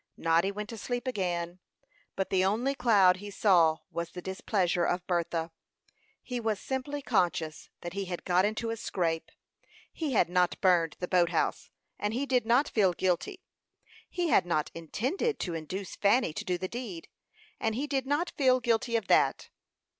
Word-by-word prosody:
Noddy 165 +3 +2
went 210 +1 -5
to 230 -2 -7
sleep 245 +3 -3
again; 180 -7 -2 0.6
but 195 - -2
the 185 -1 +3
only 225 +8 +1
cloud 200 -9 +4
he 205 +2 -8
saw 175 -6 +4
was 170 0 -3
the 180 - -8
displeasure 190 -2 0
of 180 +1 0
Bertha. 170 -2 -1 0.7
He 250 -2 -4
was 220 -3 -1
simply 275 +2 -4
conscious 170 -8 0
that 175 0 -6
he 200 0 -3
had 175 -1 -6
got 180 0 +3
into 220 +2 -1
a 230 - -3
scrape. 165 -7 -2 0.6
He 305 -5 -2
had 195 - +4
not 180 0 +1
burned 170 -4 +3
the 180 - -3
boat 175 -2 +3
house, 165 - -1 0.3
and 210 +2 -1
he 270 +3 0
did 250 -4 +1
not 245 +5 +4
feel 195 -5 +2
guilty. 190 - -1 0.7
He 350 -2 -1
had 180 - +4
not 155 -3 0
intended 260 - -2
to 175 - -2
induce 175 +5 -5
Fanny 200 -4 +2
to - - -4
do 180 -1 -1
the 185 - -3
deed, 215 -7 -6 0.5
and 220 -1 0
he 270 +5 -1
did 270 -2 -2
not 300 +5 0
feel 255 -2 +4
guilty 235 0 0
of 225 -3 0
that. - - +2
195 Hz, 175 wpm, -29 LUFS, 175-245 Hz, 0.7 s, cloud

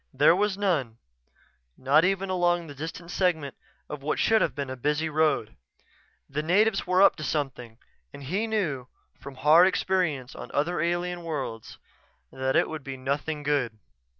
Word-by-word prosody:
There 145 +5 +5
was 200 0 0
none, 155 - 0 0.8
not 145 +4 +3
even 195 +1 0
along 175 -1 +1
the 145 - -9
distant 165 +4 -7
segment 160 -7 0 0.3
of 150 -2 -7
what 150 +2 -1
should 220 0 +3
have - - 0
been 140 -3 -4
a - - -4
busy 150 +5 -1
road. 155 -8 +1 0.7
The 145 +2 -3
natives 195 +6 +2
were 185 +1 +4
up - - +6
to 155 - -6
something 130 -7 -3 0.3
and 140 - -11
he 190 +11 -1
knew, 160 - -2 0.3
from 140 -1 -10
hard 155 +7 +6
experience 175 -10 -1
on - - -9
other 155 +5 0
alien 175 +1 -1
worlds, 140 -9 -5 0.5
that 130 0 -2
it - - +3
would 155 -2 -6
be 135 -1 -6
nothing 145 +3 -3
good. 135 -6 0
155 Hz, 165 wpm, -26 LUFS, 135-180 Hz, 0.8 s, up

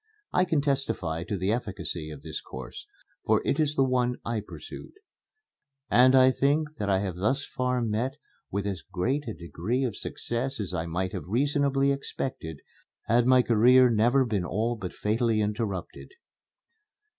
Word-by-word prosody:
I 180 - +3
can 160 -5 +1
testify 115 - -1
to 100 - -3
the 95 +3 0
efficacy 95 -8 -3
of 75 -3 -10
this - - -5
course, 65 -1 -9 0.4
for - - +3
it 140 - 0
is 150 -1 +1
the 135 - +4
one 125 -1 +1
I 115 -2 -1
pursued. 105 - -10 1.0
And 130 +2 +6
I 130 0 +7
think 150 +3 +1
that 105 -2 -2
I 95 - +3
have 95 -4 -3
thus 130 +10 0
far 125 -1 -1
met 115 +5 -1 0.3
with 100 +1 -2
as 100 -2 -3
great 130 +10 -2
a 110 - -4
degree 90 +9 -2
of 120 -6 -2
success 120 +4 -3
as 95 -3 -4
I 85 -1 -2
might 90 +3 -2
have 90 -5 -5
reasonably 140 +4 +2
expected 130 - -4 0.4
had 120 +2 +2
my 130 -1 +6
career 125 +2 +5
never 120 +5 +3
been 105 -6 -1
all 110 +7 -1
but 95 -5 -6
fatally 110 +1 0
interrupted. 105 -3 -3
115 Hz, 165 wpm, -27 LUFS, 100-130 Hz, 1.0 s, I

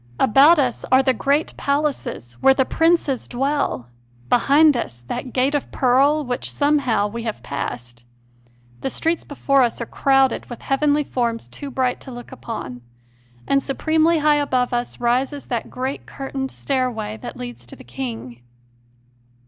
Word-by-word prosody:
About 285 +9 +6
us 255 -4 0
are 260 +1 +6
the 260 -1 +3
great 280 +5 0
palaces, 280 - -2
where 270 - +6
the 265 - +2
princes 325 -5 +1
dwell; 270 - -1 0.4
behind 285 - +5
us 120 - -4
that 250 - -4
gate 260 +3 +1
of 290 - -2
pearl 275 +4 +3
which, 245 0 -3
somehow, 280 -8 +2
we 230 +3 -6
have 225 -2 -5
passed; 120 -3 -6 0.8
the - - -2
streets 330 +5 -1
before 275 -1 +1
us 240 -2 +1
are 235 - -3
crowded 270 +1 +2
with 240 - -9
heavenly 290 +2 +2
forms 235 -4 -2
too 285 - -8
bright 255 -1 -1
to - - -10
look 245 -1 -9
upon; 125 - -7 0.6
and 275 0 +2
supremely 315 +4 +2
high 300 -1 +3
above 255 -4 0
us 240 0 -2
rises 255 +4 0
that 235 -2 -3
great 260 +2 -4
curtained 270 0 -5
stair 260 -2 -1
way 215 -2 -5
that 240 +2 -8
leads 120 -1 -8
to - - -8
the - - -14
King. 120 -1 -7
260 Hz, 155 wpm, -21 LUFS, 230-285 Hz, 0.8 s, About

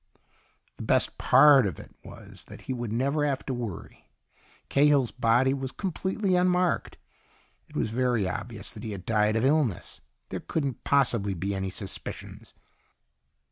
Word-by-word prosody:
The - - -7
best - - +1
part 135 -2 +6
of 90 - -5
it - - -12
was - - -12
that - - -12
he 130 - -4
would 120 -3 -4
never 140 +6 0
have 140 -3 -1
to 135 - -3
worry. 115 -8 -7 0.6
Cahill's 140 -4 +3
body 120 +4 +2
was 135 -1 -4
completely 190 +2 -1
unmarked. 180 -1 +1 0.7
It - - -16
was 110 - -1
very 120 -4 +1
obvious 105 +1 -4
that 105 - -10
he 110 - -4
had 95 -2 -8
died 105 0 +2
of 115 +2 +1
illness. 135 - 0 0.3
There - - -4
couldn't 140 -6 -3
possibly 115 -8 +2
be 95 +4 -3
any 95 -1 -3
suspicions. 95 0 -6
125 Hz, 150 wpm, -27 LUFS, 105-140 Hz, 0.7 s, part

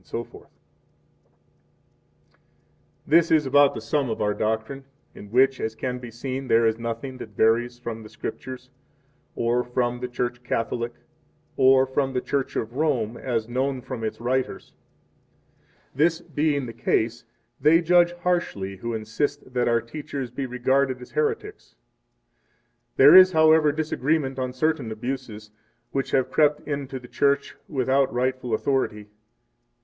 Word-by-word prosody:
5 120 - -5 2.8
This 165 +2 +4
is 155 -2 +3
about 140 +1 +4
the - - -5
Sum 135 +3 -1
of 110 - -3
our 105 -1 +1
Doctrine, 110 +6 -2 0.3
in 100 - -12
which, 130 +3 +3
as 110 0 -3
can 125 +1 -3
be 120 -1 -8
seen, 130 +3 -5
there 115 -1 +4
is 110 0 +1
nothing 115 +3 -5
that 105 -2 -10
varies 120 +2 +2
from 115 -2 -6
the 110 - -11
Scriptures, 130 +3 -7 0.6
or 120 +1 +1
from 125 0 -1
the 125 - -3
Church 120 0 -3
Catholic, 120 0 -2 0.6
or 130 0 +5
from 135 0 -1
the 125 - +1
Church 140 0 -2
of 115 +1 -3
Rome 125 -8 0
as 115 -3 -2
known 130 +2 -1
from 125 -2 -7
its 110 0 -3
writers. 130 +2 -2 1.2
This 160 +4 +2
being 150 -3 -1
the 115 - -7
case, 115 +1 -1 0.4
they 155 +4 +6
judge 175 0 +4
harshly 100 - -1
who 115 +4 -4
insist 125 +5 -3
that 125 -1 +1
our 115 0 +2
teachers 135 0 -6
be 135 +1 -4
regarded 130 +1 +1
as 125 - -12
heretics. 440 -2 -3 1.2
6 - - -48
There - - +8
is, 185 0 +9
however, 160 -1 +5
disagreement 150 -2 -1
on 130 -1 -2
certain 135 -2 -1
abuses, 110 -2 -6 0.4
which 135 -1 -2
have 130 -2 +1
crept 150 -1 +2
into 140 -2 -4
the 125 - -13
Church 140 +1 0
without 135 -1 +1
rightful 130 0 -1
authority. 130 -6 -1
130 Hz, 145 wpm, -24 LUFS, 115-140 Hz, 2.8 s, is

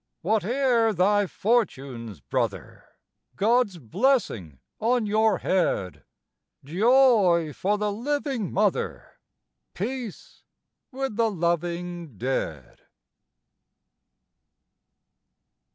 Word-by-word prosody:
Whate'er 225 +4 +2
thy 205 +2 +2
fortunes, 135 - -1
brother! - - -3 0.5
God's 220 -2 +2
blessing 155 - 0 0.2
on 235 +1 +1
your 215 +1 +2
head; 100 - -1 0.6
Joy 190 - +4
for 205 +9 0
the 210 0 -1
living 265 - -2
mother, 205 +1 -1 0.6
Peace 250 -6 -6 0.5
with 265 -4 -4
the 230 -1 +3
loving 170 - -2
dead. 85 - -4
205 Hz, 70 wpm, -25 LUFS, 170-235 Hz, 0.6 s, Joy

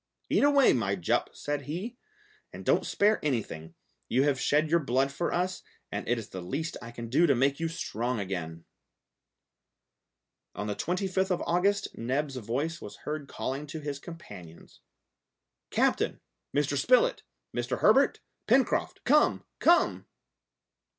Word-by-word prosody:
"Eat - - +4
away, 285 -2 +6
my 100 -5 0
Jup," 90 -3 0
said 145 0 -3
he, 195 +10 -4 0.6
"and - - -9
don't - - +2
spare 210 +2 +3
anything; 95 - -3 0.3
you 130 +3 +2
have 140 -3 +1
shed 150 +2 +3
your 170 +2 +3
blood 135 -1 +1
for 170 +5 -2
us, 180 +1 -1 0.3
and - - -4
it 120 - +2
is 110 -2 -7
the 95 - -6
least 145 - -3
I 115 - -8
can 120 0 -7
do 145 +9 +4
to 140 - +4
make 135 +3 +2
you 165 - 0
strong 125 - -2
again!" 85 -4 -5 1.9
On 105 - -4
the 105 - -1
25th 190 +2 -1
of 180 -2 0
August 195 +4 +1
Neb's 135 +3 -1
voice 135 +9 -2
was 105 - -8
heard 150 -1 -4
calling 140 +3 -4
to 155 +2 -6
his 145 -2 -4
companions. 105 - -12 0.9
"Captain, - - +1 0.3
Mr. 145 0 +1
Spilett, 255 - +3 0.3
Mr. - - -2
Herbert, - - +4 0.3
Pencroft, - - +2
come! - - +3 0.2
come!" 345 +1 +3
140 Hz, 145 wpm, -29 LUFS, 115-170 Hz, 1.9 s, away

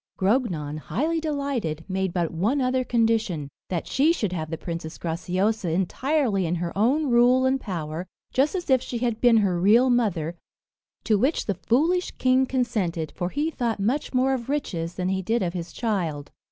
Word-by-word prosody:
Grognon, 190 - 0
highly 300 - -1
delighted, 280 - -2
made 190 -1 -1
but 170 -2 -1
one 210 - 0
other 255 0 +1
condition 225 - 0 0.2
that 175 -3 -2
she 290 +5 +3
should 215 - -1
have 155 -3 -3
the 165 - -3
Princess 165 -1 -6
Graciosa 185 +4 -1
entirely 200 - 0
in 170 - 0
her 170 0 -3
own 260 +7 +2
rule 245 +2 +5
and 265 0 +1
power, 170 -2 -4 0.3
just 280 +7 +2
as 350 -6 -2
if 260 -2 +5
she 245 - -4
had 235 -2 -1
been 240 -2 +6
her 190 -5 +2
real 235 +7 +5
mother; 175 -9 0 0.7
to 215 -3 +2
which 270 +8 +1
the 200 - 0
foolish 320 - +1
king 260 +1 +3
consented, 200 - -1
for 180 -1 -2
he 295 +8 -1
thought 235 -7 -2
much 245 +9 0
more 260 +1 +2
of 250 -1 -4
riches 175 - -2
than 185 0 -1
he 190 0 0
did 225 +3 0
of 175 -1 -2
his 175 -2 -5
child. 170 -11 -2
220 Hz, 180 wpm, -25 LUFS, 175-255 Hz, 0.7 s, been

